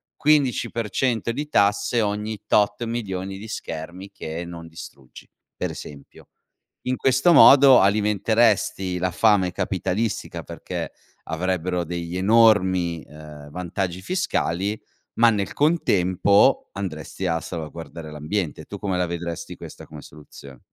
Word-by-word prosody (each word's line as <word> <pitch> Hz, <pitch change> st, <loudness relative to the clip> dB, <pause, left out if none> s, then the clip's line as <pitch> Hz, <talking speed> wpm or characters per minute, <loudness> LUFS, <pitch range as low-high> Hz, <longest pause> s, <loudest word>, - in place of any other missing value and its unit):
quindici 145 Hz, -4 st, +2 dB
per 115 Hz, -2 st, -3 dB
cento 115 Hz, +1 st, 0 dB
di 145 Hz, +5 st, -4 dB
tasse 105 Hz, +3 st, +2 dB
ogni 105 Hz, 0 st, -3 dB
tot 105 Hz, +2 st, +2 dB
milioni 95 Hz, -5 st, -4 dB
di 110 Hz, +3 st, -9 dB
schermi 90 Hz, 0 st, -7 dB
che 80 Hz, -2 st, -6 dB
non 85 Hz, -1 st, -9 dB
distruggi. 80 Hz, -5 st, -13 dB, 0.3 s
Pre -, -, -2 dB
esempio. 70 Hz, -1 st, -11 dB, 0.6 s
In 130 Hz, 0 st, 0 dB
questo 135 Hz, +7 st, +3 dB
modo 135 Hz, -2 st, +8 dB
alimenteresti 105 Hz, -1 st, +2 dB
la 90 Hz, +1 st, 0 dB
fame 95 Hz, -1 st, +3 dB
capitalistica 105 Hz, +5 st, -2 dB
perché -, -, -6 dB, 0.3 s
avrebbero 90 Hz, +1 st, -2 dB
degli 85 Hz, +1 st, -5 dB
enormi, 95 Hz, -5 st, +3 dB
ehm, 75 Hz, -1 st, -12 dB
vantaggi 90 Hz, +2 st, -4 dB
fiscali, 100 Hz, -, -1 dB, 0.4 s
ma 120 Hz, +1 st, +6 dB
nel 105 Hz, -4 st, 0 dB
contempo 100 Hz, -, +2 dB
andresti 95 Hz, -1 st, -5 dB
a 85 Hz, -2 st, +1 dB
salvaguardare 80 Hz, -1 st, -7 dB
l'ambiente. 75 Hz, +3 st, -3 dB
Tu -, -, -8 dB
come 95 Hz, -3 st, -2 dB
la 90 Hz, -, +1 dB
vedresti 85 Hz, 0 st, -5 dB
questa -, -, -11 dB
come 75 Hz, -1 st, -11 dB
soluzio 70 Hz, -3 st, -14 dB
95 Hz, 125 wpm, -23 LUFS, 85-110 Hz, 0.6 s, modo